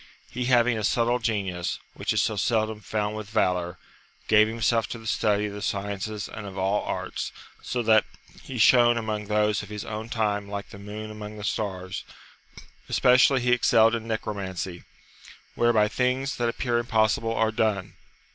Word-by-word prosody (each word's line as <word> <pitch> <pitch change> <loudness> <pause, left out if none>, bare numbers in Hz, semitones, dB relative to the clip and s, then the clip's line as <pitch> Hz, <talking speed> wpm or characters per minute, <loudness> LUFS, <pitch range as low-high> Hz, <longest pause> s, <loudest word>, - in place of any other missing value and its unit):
He 125 +1 -3
having 120 -2 +3
a - - -4
subtle 120 +3 +2
genius, 100 -6 -2 0.2
which - - -2
is - - +2
so 110 - 0
seldom 110 +1 0
found 105 0 -2
with 110 -1 -6
valour, 90 -5 0 0.5
gave 110 0 +6
himself 115 0 +1
to - - -6
the 115 - -13
study 105 -1 +1
of 105 - -5
the 105 - -7
sciences 100 +1 -3
and 105 -2 -8
of 95 0 -9
all 95 +2 +1
arts, - - -4 0.3
so 120 -1 -2
that 110 -1 +5 0.4
he 130 - -7
shone 120 +1 +6
among 110 -2 -3
those 105 0 +1
of 105 - -10
his 105 -1 -6
own 110 +1 -5
time 105 -3 -1
like 100 0 -5
the 100 - -11
moon 105 +2 -7
among 105 0 -8
the 105 - -8
stars; 95 -3 -3 0.9
especially 130 +1 +5
he 125 0 +1
excelled 115 -2 +4
in 115 -1 -3
necromancy, 95 -5 -4 0.7
whereby 115 -3 +3
things 130 +4 -1
that 120 -1 +1
appear 120 0 0
impossible 115 -1 +1
are 110 0 +2
done. 110 -4 -1
110 Hz, 170 wpm, -26 LUFS, 105-115 Hz, 0.9 s, gave